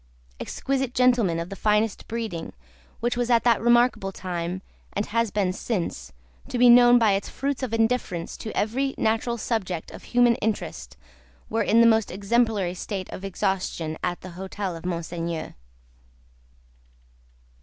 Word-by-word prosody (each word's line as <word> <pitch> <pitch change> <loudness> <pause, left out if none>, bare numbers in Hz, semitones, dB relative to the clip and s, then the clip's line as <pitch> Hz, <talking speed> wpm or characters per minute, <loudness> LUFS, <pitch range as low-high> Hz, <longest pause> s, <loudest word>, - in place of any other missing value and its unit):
Exquisite 270 -2 -2
gentlemen 240 -9 +3
of 170 +1 -4
the 195 - -6
finest 210 +1 +1
breeding, 220 -8 -4 0.5
which 240 +1 0
was 245 0 -1
at 230 -2 +4
that 235 -2 +3
remarkable 240 -4 +3
time 180 0 -4 0.3
and 205 - -1
has 230 +1 0
been 195 -3 0
since 180 - -3 0.4
to - - -3
be 245 0 +7
known 245 0 +8
by 225 -3 +4
its 195 0 -1
fruits 275 0 -3
of 260 -4 -3
indifference 225 -7 0
to 220 - -7
every 265 +6 0
natural 225 +2 0
subject 190 -7 -3
of - - -11
human 245 -1 +4
interest, 215 -1 -4 0.5
were 225 +1 +1
in 225 +2 +4
the - - +7
most 220 -2 +4
exemplary 205 -1 +1
state 190 0 -5
of 185 - -7
exhaustion, 190 -5 -2
at 175 -1 -2
the 185 - -9
hotel 190 +1 -5
of 165 +2 -6
Monseigneur. 170 -1 -4
215 Hz, 150 wpm, -25 LUFS, 185-235 Hz, 0.5 s, known